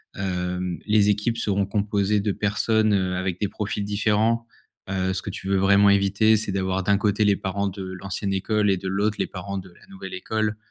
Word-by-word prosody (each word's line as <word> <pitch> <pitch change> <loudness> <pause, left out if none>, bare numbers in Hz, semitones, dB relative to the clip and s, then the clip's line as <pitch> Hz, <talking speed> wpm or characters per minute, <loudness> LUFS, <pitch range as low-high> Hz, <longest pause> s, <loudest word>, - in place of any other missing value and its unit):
hem, 90 -1 -3
les 105 -1 +4
équipes 105 +3 0
seront 100 -3 0
composées 105 0 0
de 100 +1 0
personnes, 105 +2 +1
heu, 95 -2 +1
avec 90 -1 -2
des 105 - 0
profils 105 0 -3
différents, 110 +3 +1 0.4
heu, 95 -1 0
ce 95 - -3
que - - -4
tu - - -7
veux 95 0 +2
vraiment 100 +1 +5
éviter 100 +2 +3
c'est 105 -1 -2
d'avoir 95 0 -1
d'un 100 +1 +3
côté 105 +1 +1
les 100 -1 +4
parents 100 +1 -2
de 95 +1 -8
l'ancienne 95 +1 -4
école 105 +2 +1
et 95 - +1
de 95 - -6
l'autre 100 +2 0
les - - 0
parents 100 +1 -6
de 95 - -11
la - - -20
nouvelle 195 -1 -9
école. 110 - -2
100 Hz, 205 wpm, -24 LUFS, 95-105 Hz, 0.4 s, vraiment